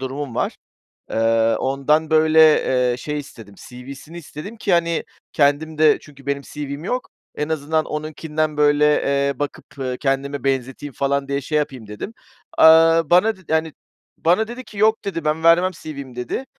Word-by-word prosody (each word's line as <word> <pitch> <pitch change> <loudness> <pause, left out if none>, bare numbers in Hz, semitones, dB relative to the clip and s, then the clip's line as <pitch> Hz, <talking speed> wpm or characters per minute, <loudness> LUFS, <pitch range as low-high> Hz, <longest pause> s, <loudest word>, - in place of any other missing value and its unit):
durumum 135 -1 -5
var. - - -2 0.5
Eee, 115 0 +2
ondan 150 +4 0
böyle, 160 0 +4 0.5
eee, - - -3
şey 150 +4 -4
istedim, 115 -8 -11
CV'sini 135 +6 -10
istedim 170 +7 -9
ki, 205 -3 -1
hani, 170 -1 +1 0.3
kendim 150 +2 +1
de 155 -1 +5
çünkü 140 -2 -17
benim 140 0 -2
CV'm 145 +1 -7
yok, 250 +6 -3 0.3
en 150 - -2
azından 155 0 -1
onunkinden 155 0 -3
böyle, 145 0 +3 0.2
eee, 140 -1 0
bakıp, 145 -1 -6
ııı, 130 -1 -3
kendime 140 0 -2
benzeteyim 135 +1 -2
falan 140 +1 -1
diye 140 0 -1
şey 150 +3 -1
yapayım 130 -6 -4
dedim. 105 - -8 0.5
Iıı, 165 0 +6
bana 205 +5 +4
dedi 185 -4 -9
yani, 160 0 0 0.5
bana 180 +7 +2
dedi 245 +2 -8
ki, 210 - -12
"Yok." 220 +1 +2
dedi, 165 -6 -4
"Ben 155 +1 -1
vermem 175 +3 +5
CV'mi." 140 -5 -8
dedi. 125 - -4
150 Hz, 165 wpm, -21 LUFS, 140-160 Hz, 0.5 s, Iıı